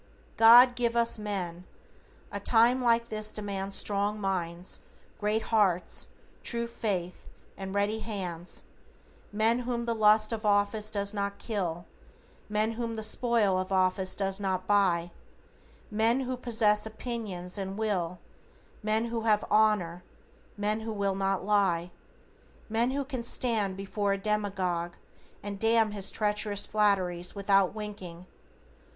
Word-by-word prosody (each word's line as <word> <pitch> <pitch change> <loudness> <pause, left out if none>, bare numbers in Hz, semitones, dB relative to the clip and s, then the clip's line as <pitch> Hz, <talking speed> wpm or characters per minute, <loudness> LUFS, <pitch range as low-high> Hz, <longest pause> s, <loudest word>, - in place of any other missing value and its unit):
"God 240 +2 +8
give 235 -1 0
us 235 -1 +1
men! 185 -5 -4 0.7
A - - -4
time 240 +2 +3
like 235 -1 +2
this 215 0 0
demands 195 -2 -4
Strong 205 +1 0
minds, 180 -2 -3 0.4
great 215 +1 0
hearts, 190 -5 +1 0.3
true 235 -1 -1
faith, 195 -6 -4 0.3
and 195 0 -6
ready 205 +2 +1
hands; 185 -6 -5 0.7
Men 220 +3 +2
whom 240 -1 -3
the 235 - 0
lust 215 0 +4
of 220 0 -4
office 210 +1 +2
does 200 -1 +1
not 200 -1 -2
kill; 175 -6 -3 0.6
Men 215 +1 +1
whom 230 0 -4
the 220 - -4
spoil 215 -4 +2
of 185 +1 -4
office 185 0 +2
does 195 0 0
not 190 -2 -2
buy; 180 -4 +2 0.8
Men 225 +4 +2
who 255 0 -2
possess 220 -4 +1
opinions 215 -6 -5
and 195 0 -4
a - - -8
will; 190 -5 -1 0.6
Men 215 +1 +1
who 230 -1 -2
have 210 -2 +3
honor, 205 -5 +2 0.5
men 210 +1 0
who 220 0 -5
will 200 -2 0
not 195 -1 -1
lie; 185 -4 +1 0.8
Men 230 +3 +1
who 275 +1 -2
can 260 -3 -4
stand 220 -5 +1
before 200 +1 -1
a - - -1
demagogue, 195 -4 -1 0.5
And 200 -1 -5
damn 225 0 +3
his 200 -2 -2
treacherous 210 -1 0
flatteries 185 -4 +1
without 195 -1 +2
winking! 190 -5 -7
210 Hz, 135 wpm, -29 LUFS, 190-225 Hz, 0.8 s, God